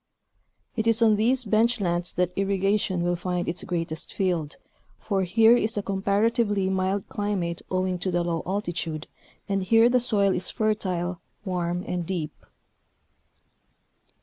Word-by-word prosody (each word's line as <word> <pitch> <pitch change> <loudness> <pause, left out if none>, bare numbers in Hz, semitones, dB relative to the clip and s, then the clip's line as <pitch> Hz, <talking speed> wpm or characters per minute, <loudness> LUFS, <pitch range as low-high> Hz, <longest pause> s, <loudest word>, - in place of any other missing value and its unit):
It 220 0 -1
is 230 0 +4
on 220 -2 +5
these 245 +4 +2
bench 225 +3 +2
lands 175 -2 0
that 180 0 0
irrigation 195 -1 0
will 175 0 +1
find 180 0 -3
its 170 - -1
greatest 165 -3 -3
field, 175 -6 -1 0.4
for 200 -3 -1
here 220 +6 +5
is 220 -2 0
a 205 - -1
comparatively 200 0 +1
mild 190 +1 -1
climate 190 -5 -2
owing 185 -1 -1
to 185 - -1
the 175 -1 0
low 170 -1 -1
altitude, 175 -5 -3 0.4
and 195 -1 0
here 225 +5 +4
the 250 0 +3
soil 205 -5 +2
is 180 - -1
fertile, 185 -5 -1 0.2
warm 175 -1 -2
and 175 -2 -3
deep. 165 -5 -3
190 Hz, 145 wpm, -25 LUFS, 175-210 Hz, 0.4 s, on